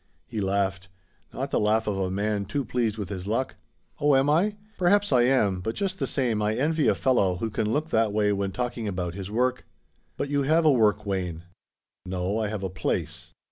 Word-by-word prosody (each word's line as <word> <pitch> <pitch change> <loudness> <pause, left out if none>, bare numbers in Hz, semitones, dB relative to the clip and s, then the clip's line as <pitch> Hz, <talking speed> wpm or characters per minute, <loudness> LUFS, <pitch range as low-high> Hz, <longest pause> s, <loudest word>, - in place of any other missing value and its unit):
He 110 - -4
laughed: 95 -1 -1 0.4
not - - -4
the - - +2
laugh 110 +1 +2
of 105 - -1
a 95 -1 0
man 100 +1 -1
too 135 +7 -2
pleased 115 -2 -1
with 100 -4 -4
his 95 -2 -5
luck. 115 +5 -1 0.5
"Oh, 145 -1 +4
am 135 +2 +3
I? 195 +7 +2 0.2
Perhaps 200 +2 +3
I 125 - +5
am, 105 -8 +2
but 110 +5 -3
just 190 -1 -2
the - - 0
same 120 -6 0
I 105 +1 +1
envy 155 +4 +1
a - - +4
fellow 100 -9 +2
who 110 +5 -3
can 105 +1 -1
look 155 +5 -1
that 110 -2 +2
way 105 0 +2
when 100 -1 -1
talking 120 0 -3
about 90 -3 -3
his 95 0 -6
work." 125 +4 0 0.5
"But 140 - -2
you 145 0 +1
have 160 +4 +3
a 155 - +7
work, 105 -4 +3
Wayne." 90 -4 -3 0.6
"No, 95 +3 -2
I 110 - 0
have 105 -1 -4
a 95 - -1
place." 95 - -3
110 Hz, 215 wpm, -26 LUFS, 100-135 Hz, 0.6 s, a